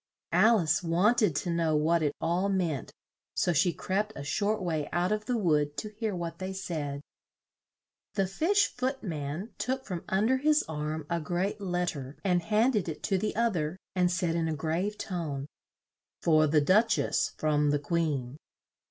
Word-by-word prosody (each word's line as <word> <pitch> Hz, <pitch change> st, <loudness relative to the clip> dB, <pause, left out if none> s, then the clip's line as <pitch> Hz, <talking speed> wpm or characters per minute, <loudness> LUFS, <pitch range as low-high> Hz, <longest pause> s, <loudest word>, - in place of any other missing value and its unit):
Al 220 Hz, +6 st, +6 dB
ice 160 Hz, -4 st, +1 dB
want 185 Hz, +8 st, +3 dB
ed 190 Hz, -9 st, +3 dB
to 175 Hz, +4 st, -1 dB
know 165 Hz, -2 st, +1 dB
what 160 Hz, +3 st, +2 dB
it 145 Hz, -2 st, 0 dB
all 175 Hz, +4 st, 0 dB
meant, 170 Hz, -, -1 dB, 0.4 s
so 175 Hz, -, +2 dB
she 175 Hz, +3 st, +3 dB
crept 205 Hz, +5 st, -2 dB
a -, -, -6 dB
short 205 Hz, +9 st, 0 dB
way 160 Hz, -5 st, -2 dB
out 175 Hz, +3 st, +1 dB
of 215 Hz, 0 st, -1 dB
the 250 Hz, -2 st, +1 dB
wood 150 Hz, -7 st, +1 dB
to 215 Hz, -, -3 dB
hear 215 Hz, -1 st, -3 dB
what 170 Hz, -1 st, -5 dB
they 190 Hz, 0 st, -4 dB
said. 150 Hz, -7 st, -4 dB, 1.1 s
The 195 Hz, -2 st, +2 dB
Fish 360 Hz, -, +2 dB
Foot 260 Hz, +1 st, -2 dB
man 160 Hz, +3 st, -4 dB
took 260 Hz, +1 st, -2 dB
from 180 Hz, -4 st, -5 dB
un 190 Hz, +3 st, +2 dB
der 260 Hz, +3 st, +3 dB
his 300 Hz, +3 st, +3 dB
arm 155 Hz, -1 st, -4 dB
a 170 Hz, +1 st, -1 dB
great 185 Hz, +6 st, -2 dB
let 180 Hz, -2 st, 0 dB
ter 140 Hz, -1 st, -7 dB
and 180 Hz, -3 st, +2 dB
hand 220 Hz, +7 st, +2 dB
ed 185 Hz, -5 st, 0 dB
it 155 Hz, -, -6 dB
to 195 Hz, -2 st, +1 dB
the 210 Hz, +2 st, -2 dB
oth 230 Hz, -2 st, +2 dB
er 155 Hz, +3 st, -2 dB, 0.2 s
and 180 Hz, -1 st, +3 dB
said 175 Hz, -2 st, 0 dB
in 165 Hz, -1 st, 0 dB
a 160 Hz, -, -1 dB
grave 170 Hz, +8 st, -1 dB
tone 160 Hz, -9 st, -4 dB, 0.8 s
"For 155 Hz, -2 st, +5 dB
the 150 Hz, 0 st, +4 dB
Duch 215 Hz, +8 st, +4 dB
ess; -, -, 0 dB
from 150 Hz, -1 st, +2 dB
the 145 Hz, -, +3 dB
Queen." 145 Hz, -4 st, -1 dB
175 Hz, 190 wpm, -29 LUFS, 155-210 Hz, 1.1 s, Al